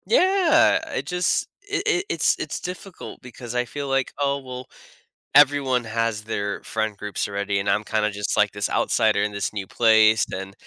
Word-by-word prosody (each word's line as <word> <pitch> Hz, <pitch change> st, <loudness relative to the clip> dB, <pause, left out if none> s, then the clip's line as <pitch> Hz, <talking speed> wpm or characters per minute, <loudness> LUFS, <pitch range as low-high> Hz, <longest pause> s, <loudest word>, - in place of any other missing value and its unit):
Yeah. 375 Hz, -7 st, +4 dB
I -, -, -3 dB
just 180 Hz, 0 st, 0 dB
it 405 Hz, 0 st, -3 dB
it 400 Hz, -3 st, +1 dB
it's -, -, +2 dB
it's -, -, -4 dB
difficult 180 Hz, +1 st, -8 dB
because 125 Hz, -1 st, -9 dB
I 125 Hz, 0 st, +1 dB
feel 140 Hz, +3 st, -6 dB
like, 135 Hz, -1 st, -1 dB
"Oh, 140 Hz, 0 st, 0 dB
well, 130 Hz, -1 st, -8 dB, 0.7 s
everyone 140 Hz, -3 st, +4 dB
has 115 Hz, -1 st, -2 dB
their 100 Hz, -2 st, -3 dB
friend 110 Hz, -2 st, -3 dB
groups 105 Hz, 0 st, -3 dB
already, 100 Hz, 0 st, -2 dB
and 100 Hz, -, -2 dB
I'm 105 Hz, -, +1 dB
kinda 105 Hz, 0 st, 0 dB
just 100 Hz, 0 st, -2 dB
like 105 Hz, -1 st, +3 dB
this 100 Hz, 0 st, -3 dB
outsider -, -, +1 dB
in 105 Hz, -, -1 dB
this 100 Hz, +1 st, -3 dB
new 95 Hz, -2 st, -5 dB
place." 110 Hz, -1 st, +4 dB
Then 95 Hz, +1 st, -6 dB
115 Hz, 180 wpm, -23 LUFS, 105-145 Hz, 0.7 s, Yeah